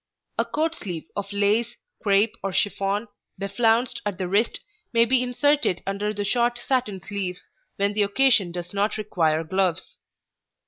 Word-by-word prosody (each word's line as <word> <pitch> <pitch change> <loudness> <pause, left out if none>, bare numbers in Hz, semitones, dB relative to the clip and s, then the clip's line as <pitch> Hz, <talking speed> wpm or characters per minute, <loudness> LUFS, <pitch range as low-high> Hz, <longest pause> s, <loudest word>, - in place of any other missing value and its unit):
A - - +3
coat 320 +2 -1
sleeve 175 - -6
of 200 - -4
lace, 210 +4 +1 0.3
crêpe, 205 +2 +3
or 195 - -2
chiffon, 200 +3 0 0.3
beflounced 225 +4 +1
at 205 -3 -3
the 185 - -2
wrist, 205 +5 +1 0.3
may 230 0 +5
be 255 +1 +3
inserted 265 - +1
under 200 +2 -1
the 205 -1 -3
short 240 +2 +1
satin 240 -7 -1
sleeves 190 -3 -4 0.3
when 200 +1 +1
the 210 - +1
occasion 205 -3 +3
does 175 +1 -6
not 205 +2 0
require 165 -7 +1
gloves. 185 +1 -1
205 Hz, 150 wpm, -24 LUFS, 195-235 Hz, 0.3 s, may